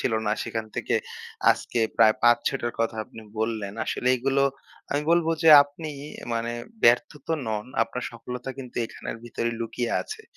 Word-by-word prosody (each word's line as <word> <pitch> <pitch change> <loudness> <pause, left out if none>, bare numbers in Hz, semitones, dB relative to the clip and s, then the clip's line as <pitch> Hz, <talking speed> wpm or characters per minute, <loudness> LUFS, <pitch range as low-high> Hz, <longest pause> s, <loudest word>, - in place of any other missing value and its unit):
ছিল 115 - 0
না। 105 - +2
সেখান 110 -1 -4
থেকে - - -1 0.6
আজকে 120 - -1 0.2
প্রায় 110 -1 +6
৫-৬ 120 +3 +4
টার 120 - -1
কথা 115 -1 0
আপনি 115 - -12 0.2
বললেন। 110 -3 -2
আসলে 125 - -1
এগুলো 135 +2 +1 0.5
আমি 145 +1 0
বলব 170 -1 +4 0.2
যে 165 - +6
আপনি 150 +2 -8 0.4
মানে 115 +1 -1 0.3
ব্যর্থ 120 +1 +5 0.2
তো 165 - 0
নন। 105 0 -2 0.2
আপনার 125 +2 -4
সফলতা 125 +2 -6
কিন্তু 125 -2 -9
এখানের - - -7
ভিতরেই 115 0 -2
লুকিয়ে 115 +1 -2
আছে। 435 +1 -8
120 Hz, 160 wpm, -26 LUFS, 115-135 Hz, 0.6 s, প্রায়